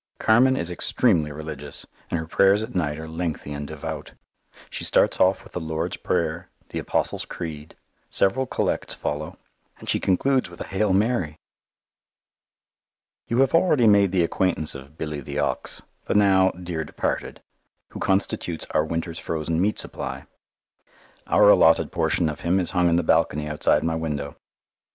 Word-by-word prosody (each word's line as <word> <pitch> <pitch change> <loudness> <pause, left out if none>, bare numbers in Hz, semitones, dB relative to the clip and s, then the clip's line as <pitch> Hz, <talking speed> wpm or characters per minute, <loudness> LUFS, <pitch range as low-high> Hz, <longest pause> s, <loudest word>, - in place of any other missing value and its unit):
Carmen 130 +4 +4
is 85 +1 -3
extremely 85 -3 +1
religious, 75 -1 -7 0.2
and 85 - -1
her 80 - -4
prayers 100 +5 +3
at 115 - -7
night 75 -5 -1
are 80 0 -7
lengthy 80 -2 -4
and 70 0 -5
devout. 80 0 -6 0.6
She - - -5
starts - - +2
off 95 +1 +3
with - - -16
the - - -2
Lord's 80 -1 -3
Prayer, - - -1 0.2
the - - -4
Apostles' - - -1
Creed; 75 -3 -7 0.3
several 130 +7 +1
collects - - -1
follow, 75 +1 -4 0.4
and - - -13
she - - +1
concludes 130 +5 +1
with 85 - -13
a - - -3
"Hail 95 +1 0
Mary!" 95 -6 +1 1.9
You 120 +3 +2
have 135 - +2
already 165 -7 +4
made 100 -3 +5
the 90 -2 +3
acquaintance 85 -3 0
of 70 +3 -11
Billy 75 -2 -4
the - - -6
Ox, - - -1 0.2
the - - -1
now 95 -2 +5
dear 90 -3 -5
departed, 75 - -3 0.5
who - - -9
constitutes 95 -3 0
our 75 - +2
winter's 80 +1 -4
frozen 80 +1 -2
meat 105 +3 +1
supply. - - -5 1.0
Our 105 - +5
allotted 80 -4 +5
portion 85 - +1
of 75 -2 -4
him 90 +3 +1
is 90 - -1
hung 90 -2 +3
in 85 - +3
the 85 - +2
balcony 75 -2 +2
outside 75 0 +2
my 80 0 0
window. 75 -3 -3
85 Hz, 160 wpm, -24 LUFS, 80-95 Hz, 1.9 s, made